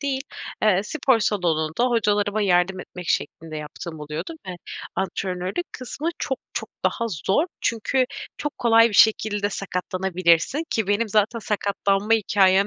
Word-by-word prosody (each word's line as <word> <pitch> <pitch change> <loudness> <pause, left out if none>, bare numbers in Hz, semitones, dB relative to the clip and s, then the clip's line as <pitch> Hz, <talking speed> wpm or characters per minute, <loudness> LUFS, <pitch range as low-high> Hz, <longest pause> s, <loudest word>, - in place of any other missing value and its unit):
değil, 275 -2 -1 0.4
eee, 205 -4 +4
spor 265 -1 +2
salonunda 175 -3 +1
hocalarıma 210 -3 +1
yardım 180 -1 +2
etmek 180 -1 -9
şeklinde 160 -1 -2
yaptığım 155 +2 -7
oluyordu 150 - -5
ve - - -4 0.5
antrenörlük 190 - -2
kısmı 275 +5 -4
çok 265 - -2 0.2
çok - - -3 0.2
daha 230 - +1 0.2
zor. 295 - +3
Çünkü 230 +3 +1 0.3
çok 295 - -4
kolay 230 -1 +6
bir - - -8
şekilde 210 -1 +4
sakatlanabilirsin 185 - +1
ki 220 -4 0
benim 205 +3 +1
zaten 215 +3 +2
sakatlanma 205 0 0
hikâyem 195 -2 +4
205 Hz, 135 wpm, -24 LUFS, 180-230 Hz, 0.5 s, kolay